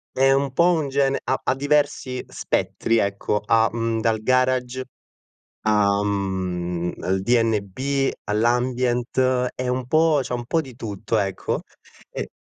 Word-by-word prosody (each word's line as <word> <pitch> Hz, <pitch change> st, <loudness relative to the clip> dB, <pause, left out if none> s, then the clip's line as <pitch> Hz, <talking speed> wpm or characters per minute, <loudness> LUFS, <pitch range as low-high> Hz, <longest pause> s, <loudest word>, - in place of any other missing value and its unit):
È 135 Hz, +1 st, +4 dB
un 135 Hz, 0 st, +1 dB
po' 170 Hz, +6 st, +4 dB
un 155 Hz, -4 st, -1 dB
gene 135 Hz, 0 st, +1 dB
ha 130 Hz, -, 0 dB
ha 130 Hz, -, 0 dB
diversi 140 Hz, -2 st, 0 dB
spettri, 115 Hz, 0 st, -1 dB
ecco, 100 Hz, 0 st, 0 dB
ha, 115 Hz, +1 st, +4 dB
mhmm, 115 Hz, -1 st, -1 dB
dal 110 Hz, -1 st, +1 dB
garage 130 Hz, +1 st, +1 dB, 0.8 s
a 105 Hz, -1 st, +2 dB
mhmm, 90 Hz, -3 st, -2 dB
al 95 Hz, +1 st, 0 dB
DNB, 115 Hz, +5 st, +1 dB
all'Ambient, 125 Hz, +2 st, +1 dB
è 130 Hz, -, -3 dB
un 125 Hz, 0 st, -2 dB
po' 155 Hz, +1 st, +3 dB
c'ha 125 Hz, -1 st, -3 dB
un 120 Hz, 0 st, -5 dB
po' 165 Hz, +7 st, +1 dB
di 130 Hz, -5 st, -12 dB
tutto, 110 Hz, -1 st, -3 dB
ecco, 95 Hz, -2 st, -1 dB, 0.5 s
e -, -, -4 dB
120 Hz, 140 wpm, -23 LUFS, 105-130 Hz, 0.8 s, È